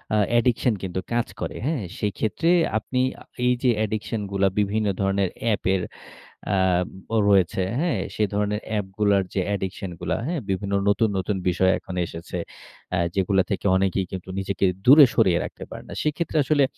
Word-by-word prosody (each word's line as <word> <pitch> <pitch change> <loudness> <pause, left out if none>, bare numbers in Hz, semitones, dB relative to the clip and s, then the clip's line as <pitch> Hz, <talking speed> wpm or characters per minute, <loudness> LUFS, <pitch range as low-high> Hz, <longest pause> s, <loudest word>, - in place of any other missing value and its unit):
আ - - +3 0.2
addiction 120 -1 +2
কিন্তু 95 0 -3
কাজ 120 0 +1
করে, - - -4
হ্যাঁ? 145 -6 -1 0.2
সেইক্ষেত্রে 110 - -1 0.3
আপনি 125 +4 -2 0.2
আ - - -11 0.2
এই 125 - +4
যে 125 - +4
addiction 110 +1 -3
গুলা 100 0 +2
বিভিন্ন 105 +1 +1
ধরনের 95 -1 +1
অ্যাপের 95 -4 +1 0.7
আ - - +3 0.6
ও - - +3
রয়েছে, 95 -1 +3 0.2
হ্যাঁ? 170 +2 0
সে 110 - -1
ধরণের 105 +1 0
অ্যাপগুলার 100 -1 +1
যে 95 - +1
addiction 95 0 -4
গুলা, - - -1
হ্যাঁ? 165 0 -2
বিভিন্ন 100 +1 -1
নতুন, 110 +2 +3
নতুন 95 +2 -1
বিষয় 95 +1 +3
এখন 95 - -9
এসেছে। 80 +1 -7 0.6
আ - - +1 0.2
যেগুলো 95 0 +2
থেকে 100 -1 -2
অনেকেই 95 -1 +1
কিন্তু 95 0 -6
নিজেকে 95 0 -1 0.2
দূরে 145 +3 +10
সরিয়ে 95 -6 +4
রাখতে - - -8
পারেনা। - - -9
সেইক্ষেত্রে 155 +2 -1
আসলে 145 0 +3
100 Hz, 160 wpm, -24 LUFS, 95-115 Hz, 0.7 s, দূরে